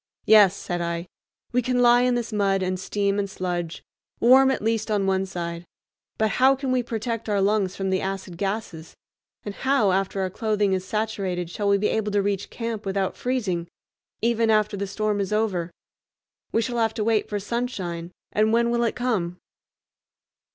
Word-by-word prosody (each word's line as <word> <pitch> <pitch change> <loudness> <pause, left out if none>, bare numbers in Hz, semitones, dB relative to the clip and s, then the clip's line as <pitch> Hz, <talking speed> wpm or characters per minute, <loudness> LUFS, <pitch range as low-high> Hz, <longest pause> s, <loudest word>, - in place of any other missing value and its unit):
"Yes," 205 -3 +7
said 175 -3 -4
I, 170 0 -2 0.5
"we 250 +1 +2
can 250 +1 0
lie 245 0 +6
in 250 0 +2
this 235 -2 -3
mud 195 -2 +1
and 185 0 -1
steam 200 +1 0
and 200 -1 -1
sludge, 175 -3 -4 0.4
warm 265 +3 +6
at 265 - -1
least 225 0 0
on 205 -2 +1
one 190 0 +1
side; 170 -2 -5 0.5
but 220 0 +1
how 265 +1 +6
can 265 -1 -3
we 255 -1 +2
protect 230 -1 -4
our 205 -1 +2
lungs 195 -1 +1
from 195 -1 -2
the 190 - +1
acid 190 -2 -4
gases, 195 -4 -4 0.5
and 205 - -4
how, 260 -5 +2
after 195 +1 0
our 185 -1 -1
clothing 210 -1 0
is 185 -1 -1
saturated, 190 -4 -2
shall 205 +2 -1
we 200 - +4
be 210 +1 +1
able 215 -1 -1
to 205 - +3
reach 200 -1 -2
camp 230 -2 -4
without 195 -1 -1
freezing, 210 -10 -2 0.6
even 230 -1 +2
after 215 -1 +2
the 200 0 -3
storm 210 +1 -1
is 195 - -3
over? 205 -6 0 0.8
We 225 - +2
shall 240 -1 -2
have 225 -1 +1
to 215 - -1
wait 220 -1 +1
for 205 - -2
sunshine, 190 -7 -4 0.2
and 215 +1 +2
when 235 +1 +3
will 235 0 +1
it 230 - 0
come?" 205 -9 -1
205 Hz, 185 wpm, -24 LUFS, 190-230 Hz, 0.8 s, Yes